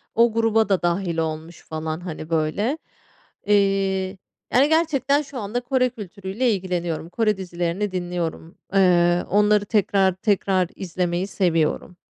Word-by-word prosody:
o 230 Hz, 0 st, +4 dB
gruba 225 Hz, -1 st, +2 dB
da 195 Hz, -2 st, +2 dB
dâhil 175 Hz, 0 st, -1 dB
olmuş 160 Hz, +1 st, -4 dB
falan, 155 Hz, 0 st, -5 dB
hani, 160 Hz, -3 st, -7 dB
böyle. 165 Hz, -, 0 dB, 0.7 s
Eee, 195 Hz, -2 st, +1 dB, 0.4 s
yani 270 Hz, +4 st, +5 dB
gerçekten 295 Hz, -4 st, +2 dB
şu 280 Hz, -3 st, -8 dB
anda 215 Hz, +3 st, -2 dB
Kore 255 Hz, 0 st, +1 dB
kültürüyle 210 Hz, +1 st, -3 dB
ilgileniyorum. 175 Hz, -4 st, -2 dB
Kore 215 Hz, +1 st, +1 dB
dizilerini 180 Hz, +2 st, -2 dB
dinliyorum, 175 Hz, -2 st, -4 dB, 0.2 s
eee, 175 Hz, -2 st, +4 dB
onları 210 Hz, +1 st, +3 dB
tekrar, 195 Hz, -2 st, +2 dB
tekrar 190 Hz, -2 st, +1 dB
izlemeyi 180 Hz, 0 st, -2 dB
seviyorum. 175 Hz, -2 st, 0 dB
190 Hz, 125 wpm, -23 LUFS, 175-215 Hz, 0.7 s, yani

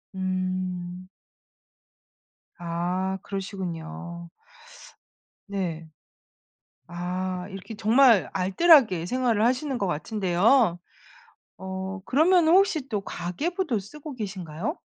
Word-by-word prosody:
음. 185 Hz, -1 st, -3 dB, 1.5 s
아 180 Hz, +3 st, -2 dB
그러시군요. 170 Hz, -3 st, -6 dB, 1.2 s
네. 170 Hz, -5 st, -4 dB, 1.0 s
아 180 Hz, +1 st, -3 dB
이렇게 195 Hz, +3 st, -8 dB
정말 225 Hz, 0 st, +5 dB
알뜰하게 190 Hz, -, +4 dB
생활을 240 Hz, -2 st, +1 dB
하시는 260 Hz, +1 st, 0 dB
거 195 Hz, -, -1 dB
같은데요. 185 Hz, -, +2 dB, 0.8 s
어 190 Hz, +1 st, -5 dB
그러면은 325 Hz, +4 st, +4 dB
혹시 340 Hz, -8 st, +3 dB
또 210 Hz, -3 st, -1 dB
가계부도 260 Hz, -, -2 dB
쓰고 295 Hz, +8 st, -9 dB
계신가요? 190 Hz, -, -5 dB
190 Hz, 190 characters per minute, -26 LUFS, 180-245 Hz, 1.5 s, 정말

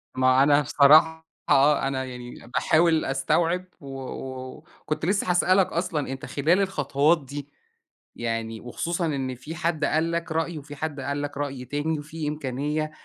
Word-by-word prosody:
ما 130 Hz, +1 st, +4 dB
أنا 145 Hz, +1 st, +5 dB
بصراحة 155 Hz, +3 st, +5 dB, 0.2 s
آه، 140 Hz, 0 st, +4 dB
أنا 130 Hz, -1 st, -2 dB
يعني 125 Hz, -2 st, -9 dB
باحاول 160 Hz, 0 st, +3 dB
أستوعب، 165 Hz, +7 st, +1 dB, 0.2 s
و 140 Hz, -, -11 dB, 0.9 s
وكنت 155 Hz, +1 st, -3 dB
لسه 195 Hz, 0 st, 0 dB
هاسألك 185 Hz, +1 st, +4 dB
أصلًا، 170 Hz, -5 st, -2 dB
أنت 135 Hz, 0 st, -6 dB
خلال 165 Hz, +7 st, +2 dB
الخطوات 150 Hz, -4 st, +1 dB
دي، 145 Hz, +1 st, -7 dB, 0.7 s
يعني 115 Hz, -1 st, -3 dB
وخصوصًا 170 Hz, +8 st, -2 dB
إن 135 Hz, -5 st, -2 dB
فيه 150 Hz, +7 st, -8 dB
حد 165 Hz, -2 st, 0 dB
قال 160 Hz, +2 st, +1 dB
لك 170 Hz, -1 st, -3 dB
رأي 165 Hz, +1 st, -1 dB
وفي 145 Hz, 0 st, -9 dB
حد 150 Hz, 0 st, -4 dB
قال 140 Hz, +2 st, -3 dB
لك 145 Hz, -1 st, -5 dB
رأي 140 Hz, -3 st, -4 dB
تاني، 145 Hz, +4 st, -2 dB
وفيه 150 Hz, +1 st, -5 dB
إمكانية 150 Hz, +1 st, -2 dB
150 Hz, 150 wpm, -25 LUFS, 135-160 Hz, 0.9 s, أنا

